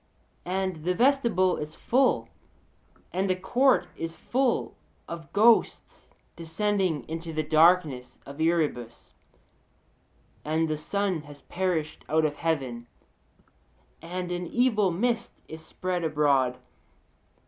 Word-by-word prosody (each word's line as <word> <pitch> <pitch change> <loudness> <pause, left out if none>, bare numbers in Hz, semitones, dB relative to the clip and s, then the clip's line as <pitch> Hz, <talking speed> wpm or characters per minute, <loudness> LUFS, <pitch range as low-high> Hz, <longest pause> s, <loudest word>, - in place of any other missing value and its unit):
And 185 -3 -2
the 180 +2 0
vestibule 235 -7 +2
is 150 +1 -6
full, 265 +2 +1 0.9
and 190 +2 0
the 185 - +2
court 245 +4 +2
is 165 0 -5
full, 240 - -1 0.3
of 165 -4 -8
ghosts 220 +3 +2 0.3
descending 175 - -1
into 165 +1 -5
the 155 0 -1
darkness 155 -5 +3
of 140 +3 -8
Erebus, 150 -8 -1 1.3
and 160 +2 0
the 155 - -1
sun 195 +1 -2
has 145 -1 -13
perished 170 -4 -2
out 155 +1 +3
of 145 -1 -2
heaven, 130 -8 -2 1.1
and 180 +2 -5
an 175 0 -3
evil 220 -3 +2
mist 230 +6 -1
is 160 0 -10
spread 180 +1 -3
abroad 145 -5 +2
(Od.).' - - -22
170 Hz, 115 wpm, -27 LUFS, 155-190 Hz, 1.3 s, darkness